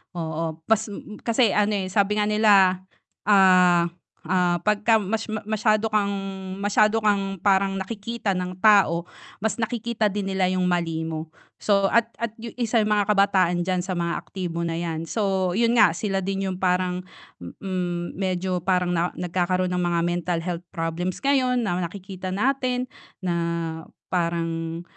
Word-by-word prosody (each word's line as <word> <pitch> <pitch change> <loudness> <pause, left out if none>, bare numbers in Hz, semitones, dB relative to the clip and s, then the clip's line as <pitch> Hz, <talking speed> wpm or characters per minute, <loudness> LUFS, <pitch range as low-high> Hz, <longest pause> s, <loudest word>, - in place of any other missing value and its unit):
oo, 160 -1 -3
kas 220 +2 +1 0.4
kasi 230 -2 +3
ano, 210 +1 +2
eh, 190 -2 -3
sabi 200 +1 +2
nga 210 - +2
nila, 205 -4 +4 0.5
ah, 185 -4 +5 0.3
ah, 175 0 +1
'pag 210 +2 0
ka 225 -2 +5
mas 215 +3 -2 0.2
masyado 215 0 +2
kang, 205 -1 +1 0.5
masyado 215 +2 +3
kang 195 -3 0
parang 195 0 +3
nakikita 200 +1 -3
ng 180 0 -3
tao, 200 -6 +5 0.4
mas 220 -2 -1
nakikita 235 -1 -1
din 200 -1 -2
nila 190 -1 +1
yung 185 0 +1
mali 165 -2 -1
mo, 160 -1 -4 0.3
so, 200 -2 +2
at 235 -1 +3 0.2
at 235 - 0
yun 230 0 -8
isa 235 -1 0
yung 215 -1 +2
mga 205 0 +1
kabataan 190 -4 +3
diyan 185 -1 0
sa 185 0 -4
mga 170 0 -1
aktibo 175 -3 -5
na' 165 -1 -2
yan, 165 -1 -4
so, 190 -4 0
yun 235 0 +3
nga 235 - +6
sila 195 -3 -1
din 195 +1 -2
yung 185 0 -6
parang, 180 -1 +1 0.4
mm, 175 - -4
medyo 185 -1 -2
parang 180 0 +1 0.2
nagkakaroon 180 +1 0
ng 180 - 0
mga 170 -1 +1
mental 175 0 -1
health 175 -1 -4
problems 165 +2 -3
ngayon 265 -2 +2
na 180 -2 -1
nakikita 185 +1 -6
natin, 250 +5 0 0.4
na 175 - +1 0.8
parang, 165 -1 -2
190 Hz, 155 wpm, -24 LUFS, 175-210 Hz, 0.8 s, nga